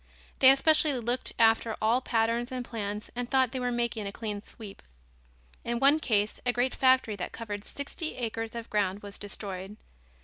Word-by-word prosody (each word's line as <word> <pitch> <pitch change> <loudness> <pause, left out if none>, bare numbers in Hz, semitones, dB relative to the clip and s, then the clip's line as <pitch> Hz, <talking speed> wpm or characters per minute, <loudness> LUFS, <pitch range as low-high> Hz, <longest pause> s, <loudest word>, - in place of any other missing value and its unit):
They 260 - +9
especially 305 +2 +4
looked 240 +2 -1
after 225 0 +3
all 230 +4 +2
patterns 235 +1 0
and 250 -1 -4
plans 210 -2 -5
and 245 0 -3
thought 260 -3 +3
they 260 - -3
were 250 0 -1
making 235 -3 -2
a - - -4
clean 210 -1 -5
sweep. 210 -2 -11 0.8
In 235 0 -2
one 280 +4 +5
case 210 -7 0
a 245 - +2
great 245 +1 0
factory 260 -5 +3
that 180 - -4
covered 205 -3 -6
sixty 285 +6 -5
acres 225 -1 -4
of 230 -1 -7
ground 205 -1 0
was 200 0 -9
destroyed. 200 -1 -6
230 Hz, 175 wpm, -28 LUFS, 210-255 Hz, 0.8 s, They